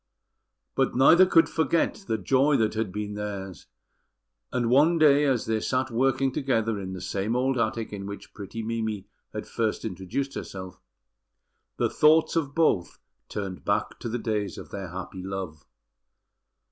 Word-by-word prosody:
But - - +1
neither 165 +8 +7
could 165 -3 +5
forget 165 +5 0
the 110 - 0
joy 135 +8 +3
that 110 -3 +1
had 110 -3 -2
been 105 +1 -4
theirs; 100 -5 -6 0.8
and 125 -2 0
one 155 +6 +5
day 150 -2 +5
as 130 -5 +1
they 110 0 0
sat 130 +3 -1
working 135 +2 +2
together 115 -6 0
in 95 -1 -5
the 95 - -6
same 100 +5 -2
old 130 +2 +1
attic 110 -1 -1
in 100 -1 -5
which 100 0 -9
pretty 110 +2 -6
Mimi 110 -3 -3 0.3
had 105 - -5
first 115 -2 -2
introduced 110 +8 -3
herself, 95 -1 -7 1.0
the - - +2
thoughts 155 +2 +4
of 145 -4 -1
both 155 - +2 0.3
turned 95 -3 -5
back - - -1
to 115 - -4
the 120 - -1
days 105 -5 -2
of - - -10
their 100 -2 -5
happy 95 +1 -7
love. 95 -5 -6
110 Hz, 160 wpm, -26 LUFS, 100-135 Hz, 1.0 s, neither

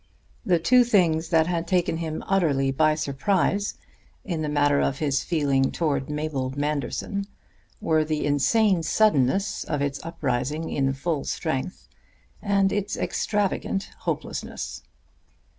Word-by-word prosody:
The 180 -2 +3
two 245 +9 +5
things 175 -8 +2
that 160 -2 +4
had 170 -1 -2
taken 175 -3 +1
him 160 -1 -4
utterly 145 -8 +2
by 155 +3 +3
surprise 185 +7 0 0.5
in 170 -5 -2
the 150 - -2
matter 145 -1 +3
of 135 - 0
his 140 -3 0
feeling 140 -5 +1
towards 145 -5 -1
Mabel 150 -3 -2
Manderson 150 +7 -2 0.5
were 160 -1 +2
the 155 -1 -2
insane 185 - +3
suddenness 195 0 +2
of 150 - -2
its 140 0 -2
uprising 155 -1 -2
in 135 -1 +1
full 145 +1 -2
strength 135 +8 -3 0.5
and 200 -2 +2
its 205 -1 -2
extravagant 200 -1 -1
hopelessness. - - -4
155 Hz, 125 wpm, -25 LUFS, 140-185 Hz, 0.5 s, two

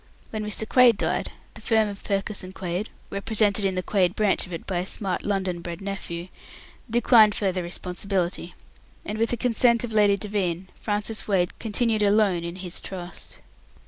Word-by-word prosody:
When 215 -1 -3
Mr. 210 +1 -2
Quaid 245 -3 +6
died, - - -1 0.2
the - - -10
firm 220 -2 +2
of 200 -1 -8
Purkiss 200 0 -1
and 185 +1 -9
Quaid 185 +3 -3 0.2
(represented 205 0 +1
in 190 -1 +1
the 185 - -1
Quaid 185 -1 +1
branch 210 -3 +2
of - - -13
it 165 - -6
by 185 -3 -1
a 180 - -2
smart 190 -3 -1
London 190 -4 -1
bred 170 -1 -6
nephew) 190 -3 -5 0.6
declined 225 -2 +5
further 190 -3 0
responsibility; 180 0 -3 0.5
and, 215 +1 -4
with 230 0 +2
the 240 - +4
consent 235 0 +3
of 230 -2 -4
Lady 205 -2 +4
Devine, 190 -3 -2
Francis 210 +1 -1
Wade 185 -4 0
continued 225 0 0
alone 200 -4 +3
in 170 +1 -5
his 180 -2 -3
trust. 180 -2 -7
200 Hz, 175 wpm, -25 LUFS, 180-215 Hz, 0.6 s, Quaid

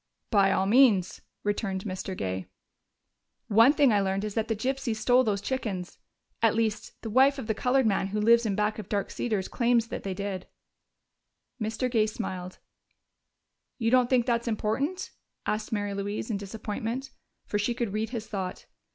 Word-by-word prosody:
"By 200 -3 +5
all 190 - +2
means," 210 -4 +4 0.2
returned 200 -2 -1
Mr. 190 -1 -5
Gay. 95 0 -3 1.0
"One 225 +5 +7
thing 285 -5 +4
I 205 - +3
learned 195 +1 -1
is 210 -1 -3
that 225 0 -1
the 225 - 0
gypsies 255 +1 -1
stole 245 +4 +4
those 205 -4 0
chickens. 200 -9 -4 0.4
At 225 -1 +4
least 220 -2 -2
the 225 - -4
wife 270 +4 +5
of 265 - -5
the 220 - 0
colored 255 +4 +2
man 195 -2 +1
who 210 +2 -2
lives 235 +2 +5
in 200 - 0
back 210 +1 0
of 210 - -8
Dark 200 -2 -1
Cedars 215 -6 -1
claims 235 -1 +2
that - - -4
they 195 -2 -4
did." 195 -1 -4 1.1
Mr. 220 +4 -1
Gay 225 -3 +2
smiled. 185 -3 -5 1.2
"You 230 -2 0
don't 250 -1 +4
think 250 -3 +3
that's 235 -1 0
important?" 235 - -1 0.3
asked 215 +2 -2
Mary 205 -2 -1
Louise 205 +3 -3
in 205 - 0
disappointment, 220 +6 -4 0.3
for 205 - -1
she 235 +4 0
could 235 -5 -2
read 215 +1 -1
his 230 -3 -4
thought. 190 -4 -5
215 Hz, 175 wpm, -28 LUFS, 200-240 Hz, 1.2 s, One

